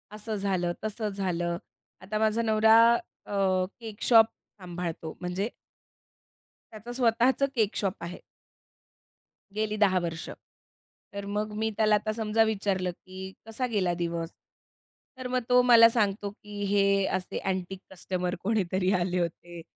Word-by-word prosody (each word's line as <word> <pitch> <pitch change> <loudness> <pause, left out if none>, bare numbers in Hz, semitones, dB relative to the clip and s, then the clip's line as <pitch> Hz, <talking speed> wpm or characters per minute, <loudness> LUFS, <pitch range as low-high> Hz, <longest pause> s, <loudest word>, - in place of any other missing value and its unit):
असं 215 +1 -5
झालं, 190 -4 -1
तसं 215 0 -2
झालं. 175 -3 -2 0.4
आता 205 +3 -3
माझा 220 +1 +2
नवरा 220 0 +5 0.5
अ, 190 -2 +1
केक 220 -3 -9
शॉप 225 -2 +7 0.3
सांभाळतो, 170 -3 -5
म्हणजे 185 +5 -2 1.2
त्याचं 220 +3 -8
स्वतःचं 245 +2 +2
केक 220 -3 +1
शॉप 195 -2 0
आहे. 175 +1 -6 1.4
गेली 215 0 -1
10 190 -3 +4
वर्ष. 165 -1 -5 0.8
तर 200 0 -5
मग 210 +1 -2
मी 220 +1 0
त्याला 215 -1 +4
आता 210 +1 -1
समजा 220 0 +2
विचारलं, 195 -4 -1
की 190 +2 -10
कसा 225 +3 -3
गेला 185 -5 +1
दिवस? 170 -1 -3 0.9
तर 255 -1 -5
मग 250 -1 -1
तो 250 0 +6
मला 235 -2 +8
सांगतो, 205 -3 0
की 205 0 -8
"हे 200 -1 +3
असे 185 - -6
अँटीक 190 0 -3
कस्टमर 180 -1 -3
कोणीतरी 190 -3 +1
आले 180 +1 0
होते 170 0 -4
200 Hz, 135 wpm, -28 LUFS, 185-220 Hz, 1.4 s, मला